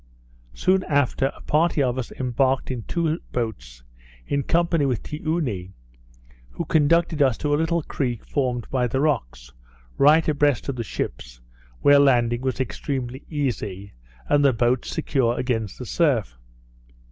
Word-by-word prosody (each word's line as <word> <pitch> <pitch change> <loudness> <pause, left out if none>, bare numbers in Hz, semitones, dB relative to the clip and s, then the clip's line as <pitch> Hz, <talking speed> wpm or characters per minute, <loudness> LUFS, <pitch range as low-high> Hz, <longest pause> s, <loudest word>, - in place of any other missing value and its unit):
Soon 185 - +2
after, 140 -2 +1
a - - -9
party 155 -1 +2
of 125 0 0
us 125 - -5
embarked 130 +1 0
in 125 -2 -4
two 165 +6 -1
boats, 110 - -5 0.4
in 140 - 0
company 170 +1 +1
with 130 -5 -1
Tioony, 150 - -3 0.8
who 170 - -5
conducted 160 +1 +2
us 130 -5 +3
to 145 -1 -1
a - - +5
little 165 +1 0
creek 125 -6 -3
formed 125 -4 -1
by 125 -2 +1
the 130 +3 -1
rocks, - - -2 0.5
right 155 +3 +5
abreast 145 -4 +1
of 135 - -2
the 120 - -3
ships, - - -5 0.4
where 145 0 +6
landing 120 -4 +3
was 130 -1 -2
extremely 130 +1 -3
easy, 105 - -3 0.3
and 145 0 +3
the 140 -2 +5
boats 120 +2 +1
secure 130 -7 0
against 115 -6 -2
the 125 - -7
surf. 115 - 0
130 Hz, 145 wpm, -23 LUFS, 120-150 Hz, 0.8 s, where